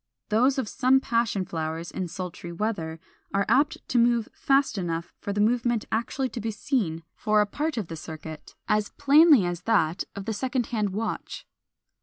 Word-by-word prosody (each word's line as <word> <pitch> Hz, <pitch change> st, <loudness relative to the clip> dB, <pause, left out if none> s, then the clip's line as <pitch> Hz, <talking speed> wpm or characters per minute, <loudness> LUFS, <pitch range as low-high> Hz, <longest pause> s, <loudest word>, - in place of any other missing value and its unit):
Those 250 Hz, +6 st, +3 dB
of 260 Hz, -5 st, -1 dB
some 260 Hz, +4 st, +3 dB
Passion 230 Hz, -6 st, 0 dB
flowers, 160 Hz, 0 st, -4 dB
in 185 Hz, -, -3 dB
sultry 175 Hz, 0 st, -6 dB
weather, 170 Hz, -4 st, -3 dB, 0.4 s
are 200 Hz, -, +2 dB
apt 285 Hz, +3 st, +2 dB
to 245 Hz, -, +3 dB
move 235 Hz, -1 st, +3 dB
fast 275 Hz, -2 st, +2 dB
enough 170 Hz, -2 st, -3 dB
for 200 Hz, -, -4 dB
the 205 Hz, -, -2 dB
movement 235 Hz, +1 st, +2 dB
actually 245 Hz, +4 st, -1 dB
to 240 Hz, -, -6 dB
be 225 Hz, -, -2 dB
seen 205 Hz, -, -1 dB
for 215 Hz, -1 st, +1 dB
a 210 Hz, -, +4 dB
part 295 Hz, +7 st, -3 dB
of 210 Hz, -6 st, -2 dB
the 165 Hz, -, -6 dB
circuit, 160 Hz, 0 st, -9 dB
as 210 Hz, -1 st, +1 dB
plainly 290 Hz, -, +6 dB
as 175 Hz, 0 st, -3 dB
that 175 Hz, -6 st, +2 dB
of 200 Hz, -1 st, -6 dB
the 220 Hz, -, -2 dB
second 250 Hz, +2 st, -1 dB
hand 215 Hz, -3 st, -1 dB
of 190 Hz, -, -6 dB
a -, -, -2 dB
watch. 225 Hz, -, -4 dB
215 Hz, 190 wpm, -26 LUFS, 175-245 Hz, 0.4 s, plainly